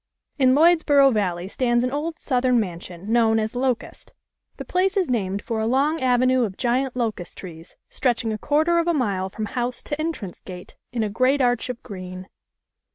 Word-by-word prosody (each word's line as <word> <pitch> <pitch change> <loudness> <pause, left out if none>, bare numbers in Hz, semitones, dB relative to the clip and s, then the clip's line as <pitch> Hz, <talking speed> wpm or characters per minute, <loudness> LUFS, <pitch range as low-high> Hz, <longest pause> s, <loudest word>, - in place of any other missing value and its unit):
(In 260 -1 +5
Lloydsboro 300 -4 +5
Valley 180 -4 -1
stands 240 +3 +1
an 250 - -1
old 310 +3 -3
Southern 250 -2 +1
man 180 -6 -3
sion, 180 +4 -9
known 225 -1 +3
as 220 0 -1
"Locust." 250 -1 -3 0.4
The - - -7
place 380 +2 0
is 365 -9 +1
named 200 -4 -1
for 230 -2 -3
a 220 - 0
long 285 +6 +1
avenue 255 0 +3
of 195 -4 -4
giant 255 +1 0
locust 220 -8 -3
trees 165 -3 -11
stretching 235 -3 -1
a 215 - -5
quar 295 +6 +2
ter 340 0 +3
of 335 - -1
a 340 - +2
mile 195 -8 -1
from 215 +3 -5
house 245 +3 -3
to 295 +1 -4
entrance 305 - -4
gate, 180 -1 -10 0.2
in 235 -2 -1
a 215 - -1
great 255 +6 +2
arch 245 -2 +1
of 250 -2 -6
green. 185 -1 -8
245 Hz, 195 wpm, -23 LUFS, 205-270 Hz, 0.4 s, In